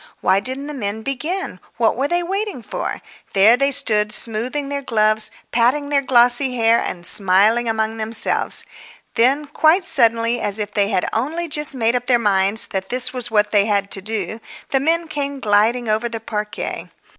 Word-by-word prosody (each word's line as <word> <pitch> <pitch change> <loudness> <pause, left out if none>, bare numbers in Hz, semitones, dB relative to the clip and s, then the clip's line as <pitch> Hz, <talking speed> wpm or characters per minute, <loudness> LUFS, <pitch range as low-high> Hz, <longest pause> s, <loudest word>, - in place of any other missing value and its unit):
Why 195 - +3
didn't 260 +6 -5
the 300 - -6
men 220 -4 -4
begin? 300 - -4 0.2
What 230 -1 +2
were 270 +3 -1
they 345 +2 0
waiting 390 - -4
for? - - -5 0.3
There 205 +4 +6
they 275 +2 +1
stood, 215 -7 +2
smoothing 235 +7 -3
their 280 0 -3
gloves, 215 -3 +1 0.2
patting 255 +5 +1
their 285 -1 +2
glossy 250 0 +3
hair 230 0 +3
and 175 -1 -4
smiling 210 +6 +3
among 220 0 -1
themselves. 220 +1 -2 0.5
Then, 260 +5 +2
quite 315 +5 +2
suddenly, 230 -7 +2
as 205 0 0
if 210 -1 -4
they 200 -1 +1
had 190 -4 0
only 315 +9 -2
just 300 -2 0
made 230 -1 +1
up 245 0 -2
their 250 -2 +4
minds 200 -1 +2
that 190 0 -4
that 255 0 +3
was 245 -1 -3
what 210 -2 +1
they 205 0 +3
had 200 -2 0
to 195 - -1
do, 220 +2 -4 0.3
the 270 - +2
men 330 +4 0
came 285 -2 -3
gliding 225 +2 +2
over 220 +2 0
the 230 -1 -5
parquet. 210 -1 -5
235 Hz, 180 wpm, -19 LUFS, 215-275 Hz, 0.5 s, There